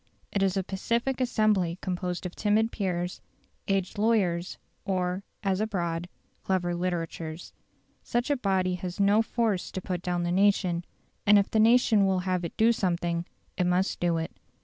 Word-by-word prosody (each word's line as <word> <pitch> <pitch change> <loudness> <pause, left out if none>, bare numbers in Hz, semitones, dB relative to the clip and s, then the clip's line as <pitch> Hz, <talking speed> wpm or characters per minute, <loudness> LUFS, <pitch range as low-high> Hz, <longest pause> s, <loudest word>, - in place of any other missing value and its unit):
It 200 - 0
is 195 0 +2
a 190 - +1
pacific 235 +8 -1
assembly 210 -8 +2
composed 180 -1 -3
of 180 - -4
timid 220 +2 +2
peers, 180 -3 -2 0.5
aged 195 +1 -1
lawyers, 195 -6 +1 0.3
or, 185 0 -1 0.2
as 195 0 +1
abroad, 175 -5 -2 0.3
clever 180 -2 0
litterateurs. 170 -2 -4 0.5
Such 240 +4 -1
a - - +3
body 190 -6 +1
has 180 0 -5
no 200 +2 +5
force 225 -4 -1
to - - -3
put 180 -1 -4
down 175 -1 -1
the 175 - -1
nation, 185 -2 +2 0.4
and 205 0 +8
if 200 - +2
the 220 - +2
nation 220 -3 +5
will 190 -1 +1
have 180 -1 -1
it 170 - -6
do 225 +1 +5
something 175 -5 -1 0.3
it 180 - +2
must 180 +2 +1
do 170 -1 +1
it. 160 0 -3
185 Hz, 165 wpm, -28 LUFS, 175-210 Hz, 0.5 s, and